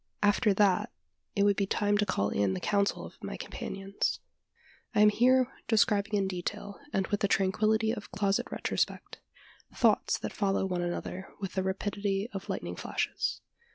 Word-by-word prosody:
After 205 +1 +4
that, 205 +2 +3 0.4
it 200 - +3
would 205 0 +4
be 200 0 0
time 205 +1 +1
to 210 - +2
call 100 - +1
in 100 -2 +1
the - - -3
counsel 200 - 0
of - - -14
my - - -5
companions. 195 +1 -3 0.8
I 210 - +5
am 210 - +8
here 255 +4 +3
describing 210 -2 +3
in 195 -1 +1
detail, 190 +2 -5
and 195 - +1
with 205 - -1
the 200 - +2
tranquillity 215 +4 +2
of 210 - -6
closet 200 0 0
retrospect, - - -2 0.6
thoughts - - +3
that - - -5
follow 195 -2 +1
one 180 -2 -1
another 175 +2 -4
with 195 -2 -4
the 190 - 0
rapidity 195 +1 -1
of 195 -1 -6
lightning - - -3
flashes. - - -2
200 Hz, 165 wpm, -30 LUFS, 190-210 Hz, 0.8 s, am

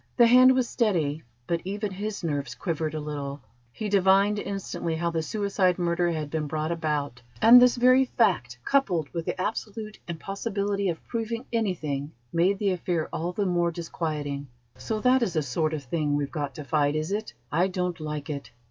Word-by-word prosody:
The 240 - +8
hand 255 +2 +7
was 255 -2 +1
steady, 165 - 0 0.2
but 170 +3 -1
even 205 +2 -3
his 205 +1 -4
nerves 145 -4 -2
quivered 160 -3 -2
a - - -2
little. 145 -2 -5 0.3
He 210 - -4
divined 200 +1 +4
instantly 195 -5 -3
how 170 +1 -1
the 165 -1 -1
suicide 195 0 +1
murder 175 0 +1
had 155 -3 -3
been 155 -2 -1
brought 155 +2 -2
about, 150 -6 -2 0.2
and 245 +2 +9
this 250 0 +6
very 255 +2 +5
fact, 120 - +1
coupled 185 - +1
with 165 -2 -3
the - - -2
absolute 215 +2 -4
impossibility 200 +3 -2
of 165 - -4
proving 230 +1 -3
anything, 155 -10 -1 0.2
made 180 +4 +3
the 200 -1 +1
affair 175 -3 -1
all 170 +2 -2
the 200 +3 -1
more 175 -2 +2
disquieting. 155 -4 -4 0.3
"So 215 +13 -3
that 255 +2 +4
is 215 -6 0
the 155 -3 +1
sort 155 +4 0
of 155 -3 -4
thing 145 +2 -1
we've 145 -1 -1
got 145 -4 -4
to 150 - -6
fight, 145 0 +1
is 155 +3 -2
it? 210 - -3 0.2
I 175 +5 +3
don't 180 -2 -2
like 150 -1 -4
it. 140 -1 -6
170 Hz, 185 wpm, -26 LUFS, 150-205 Hz, 0.3 s, and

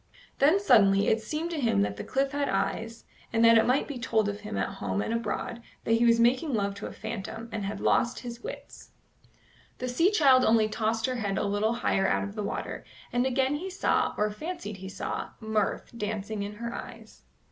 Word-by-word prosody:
Then 310 +8 +5
suddenly 200 - +5
it 220 - +2
seemed 310 +9 -3
to 315 -4 -2
him 225 - +3
that 100 0 -2
the - - -6
cliff 270 +1 0
had 285 -1 -1
eyes, 225 +1 -2 0.3
and 230 0 +3
that 230 0 +8
it 225 - +5
might 255 +3 +2
be 280 -4 -6
told 220 -3 +1
of 205 0 -3
him 210 0 -6
at - - 0
home - - -1
and 220 - -1
abroad 230 +1 -3 0.2
that - - -2
he 230 +1 +4
was 230 0 +5
making 255 +4 +3
love 200 -2 0
to 200 - -5
a - - -8
phantom, 225 +1 -6
and 215 -2 -3
had 200 +1 -4
lost 240 - +1
his 240 -1 -7
wits. - - -9 0.9
The 255 - -4
sea 290 +9 +3
child 275 -10 +5
only 220 -2 +4
tossed 220 +1 -1
her 255 -1 -1
head 200 -4 -2
a - - 0
little 205 +3 +1
higher 195 -4 +1
out - - +1
of 200 0 -5
the 215 - -4
water, 200 - -4 0.3
and 245 +1 +2
again 265 +1 +1
he 370 +5 -5
saw, 375 - +1
or 210 0 +1
fancied 305 - -6
he 190 0 -8
saw, 195 - -4
mirth 220 +1 -2
dancing 210 -1 -3
in 205 +1 -5
her 235 +2 -5
eyes. - - -10
230 Hz, 215 wpm, -28 LUFS, 210-255 Hz, 0.9 s, that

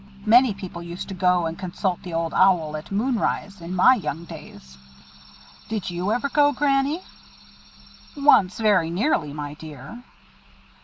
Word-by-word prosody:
Many 235 0 +5
people 185 -3 -8
used 170 +1 -7
to - - -5
go 180 -2 +2
and 165 0 -5
consult 185 0 -3
the 180 - -8
Old 165 0 -2
Owl 170 -5 +3
at 155 +4 -8
moon 230 +4 0
rise, 200 -2 -3
in 170 +2 -6
my 185 +8 +6
young 170 - -4
days." 65 - -12 0.9
"Did 215 -4 -3
you 180 +4 -2
ever 245 +5 0
go, 290 +1 +3
Granny?" 280 +4 0 1.1
"Once, 210 -10 +4
very 205 -7 +3
nearly, 175 - 0
my 145 0 -6
dear." 150 - -11
185 Hz, 150 wpm, -23 LUFS, 165-235 Hz, 1.1 s, my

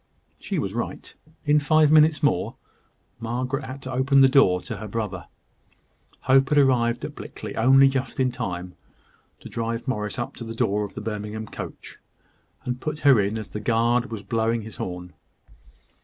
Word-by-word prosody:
She - - -4
was - - -2
right. - - -5 0.3
In 150 0 +4
five 155 0 +4
minutes 155 0 +5
more, 90 -11 +1 0.6
Margaret 125 +4 -3
had 130 +1 -8
to 130 - -6
open 135 +2 +3
the 135 - +8
door 130 -10 +4
to - - -6
her 110 - -7
brother. 105 -4 -4 0.9
Hope 135 +1 +4
had 150 - +2
arrived 120 -4 +3
at - - -7
Blickley - - -8
only 135 +4 +6
just 135 0 -2
in 130 -1 +2
time 90 -4 -5 0.7
to - - -9
drive 115 +1 -4
Morris 105 -4 -2
up 130 +2 -4
to - - -7
the 115 0 -7
door 105 -1 0
of 100 - -7
the - - -5
Birmingham 105 0 -5
coach, - - -9 0.6
and 125 0 -4
put 155 0 -4
her 135 -6 +6
in 100 +3 -1
as 110 - -6
the 105 - -5
guard 120 +3 +1
was 110 -3 -6
blowing 115 +2 0
his 110 0 -10
horn. 90 -1 -6
120 Hz, 175 wpm, -24 LUFS, 105-135 Hz, 0.9 s, the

